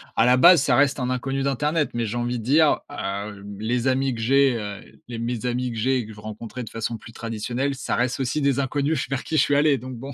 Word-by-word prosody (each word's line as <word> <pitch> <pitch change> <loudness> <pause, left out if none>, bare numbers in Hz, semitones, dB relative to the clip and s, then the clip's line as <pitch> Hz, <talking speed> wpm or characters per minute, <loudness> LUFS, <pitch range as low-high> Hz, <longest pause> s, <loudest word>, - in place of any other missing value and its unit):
à 115 - +4
la 125 +1 +5
base, 170 +1 +7
ça 125 -4 +3
reste 140 0 +3
un 125 - -1
inconnu 135 +2 -2
d'internet. 150 +3 0
Mais, 120 -1 -1
j'ai 110 - -4
envie 120 0 -2
de 110 - -7
dire, 150 +5 +4
heu, 100 -4 -5 0.2
les 120 +3 -1
amis 135 0 +1
que 115 - -6
j'ai, 135 +2 +3
heu, 105 -2 -8
les 115 - -5
mes 120 0 -3
amis 125 0 -1
que 115 - -6
j'ai 130 +4 +1
et 120 - -2
que 110 - -10
je 105 - -14
rencontrais 110 +3 -7
de 110 - -9
façon 115 +1 -4
plus 115 - -13
traditionnelle, 120 +5 -3
ça 130 - -2
reste 125 +2 0
aussi 130 +3 -1
des 140 -1 +2
inconnus 140 +2 -1
vers 135 -2 -2
qui 160 - -3
je - - +6
suis 145 - +1
allé, 145 -1 +4
donc, 130 +1 -8
bon. 135 +3 -8
125 Hz, 260 wpm, -23 LUFS, 115-140 Hz, 0.2 s, base